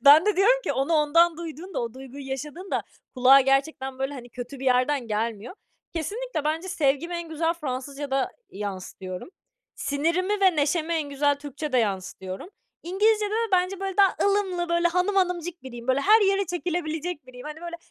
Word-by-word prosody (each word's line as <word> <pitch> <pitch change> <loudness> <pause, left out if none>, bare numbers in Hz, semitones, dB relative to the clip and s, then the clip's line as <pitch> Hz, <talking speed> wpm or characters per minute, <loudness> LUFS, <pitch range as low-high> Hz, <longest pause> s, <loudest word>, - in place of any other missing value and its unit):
Ben 305 +6 +9
de 420 - +2
diyorum 475 +6 +5
ki: - - 0
"Onu 270 +5 0
ondan 325 +2 +4
duyduğunda, 340 +3 -6
o 230 0 -5
duyguyu 265 +1 -9
yaşadığında 300 +8 -4 0.3
kulağa, 260 +1 +7
gerçekten, 270 0 0
böyle, 270 +2 -2
hani, 245 -3 -9
kötü 245 +3 -7
bir - - -5
yerden 255 +1 +2
gelmiyor." 220 - -2 0.4
Kesinlikle, 410 +1 -3
bence 320 +4 -1
sevgimi 305 +1 0
en 340 -1 -4
güzel 325 +1 0
Fransızcada 275 -2 -3 0.2
yansıtıyorum. 190 - -6 0.5
Sinirimi 340 +8 0
ve 375 -4 +4
neşemi 310 +3 +1
en 310 -3 -1
güzel 285 +1 +2
Türkçede 285 -1 -2
yansıtıyorum. 190 - -3 0.3
İngilizcede 420 +4 +2
de 450 +1 0
bence, 365 +1 +2
böyle, 390 -1 -3
daha 395 -2 +5
ılımlı, 385 -4 +1
böyle, 340 0 +3
hanım 360 +4 +1
hanımcık 355 -2 0
biriyim. 240 -2 -9
Böyle, 260 +1 +3
her 430 +8 +6
yere 395 -1 +2
çekilebilecek 340 -3 -3
biriyim. 250 +1 -11
Hani, 305 +1 -7
böyle, 340 0 -6
310 Hz, 165 wpm, -26 LUFS, 265-360 Hz, 0.5 s, Ben